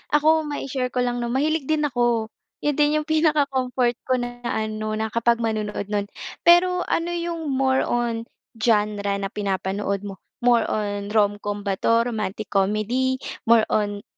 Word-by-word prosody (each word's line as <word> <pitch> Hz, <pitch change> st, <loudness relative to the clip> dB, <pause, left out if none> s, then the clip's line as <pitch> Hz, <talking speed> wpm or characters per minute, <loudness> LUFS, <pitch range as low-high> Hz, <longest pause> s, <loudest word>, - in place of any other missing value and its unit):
Ako 310 Hz, +1 st, +4 dB
mai 290 Hz, -2 st, -4 dB
share 255 Hz, -1 st, -2 dB
ko 250 Hz, -, +1 dB
lang 245 Hz, 0 st, -1 dB
'no, 240 Hz, -, -2 dB
mahilig 300 Hz, +2 st, 0 dB
din 310 Hz, 0 st, +1 dB
ako. 240 Hz, -5 st, +1 dB, 0.3 s
'Yon 295 Hz, -1 st, 0 dB
din 295 Hz, 0 st, +3 dB
yung 305 Hz, -, -9 dB
pinaka-comfort 270 Hz, -6 st, +1 dB
ko 260 Hz, -, 0 dB
na 245 Hz, 0 st, -5 dB
na -, -, -1 dB, 0.2 s
ano, 215 Hz, 0 st, -3 dB
na 220 Hz, 0 st, -1 dB
kapag 235 Hz, +1 st, +2 dB
manonood 215 Hz, -3 st, -2 dB
no'n. 205 Hz, -1 st, -1 dB, 0.4 s
Pero, 360 Hz, +1 st, +5 dB
ano 335 Hz, +1 st, -1 dB
yung 335 Hz, -2 st, -3 dB
more 265 Hz, -1 st, +2 dB
on, 235 Hz, -1 st, 0 dB, 0.3 s
genre 210 Hz, -3 st, +1 dB
na 200 Hz, 0 st, -3 dB
pinapanood 200 Hz, 0 st, -2 dB
mo? 195 Hz, -2 st, -8 dB, 0.2 s
More 240 Hz, -2 st, +4 dB
on, 205 Hz, -1 st, -2 dB
romcom 205 Hz, -1 st, 0 dB
ba 195 Hz, -, +1 dB
'to, 230 Hz, 0 st, +3 dB
romantic 215 Hz, -2 st, -3 dB
comedy, 215 Hz, +7 st, +1 dB, 0.3 s
more 230 Hz, -1 st, +6 dB
on 205 Hz, -1 st, 0 dB
235 Hz, 165 wpm, -23 LUFS, 210-270 Hz, 0.4 s, more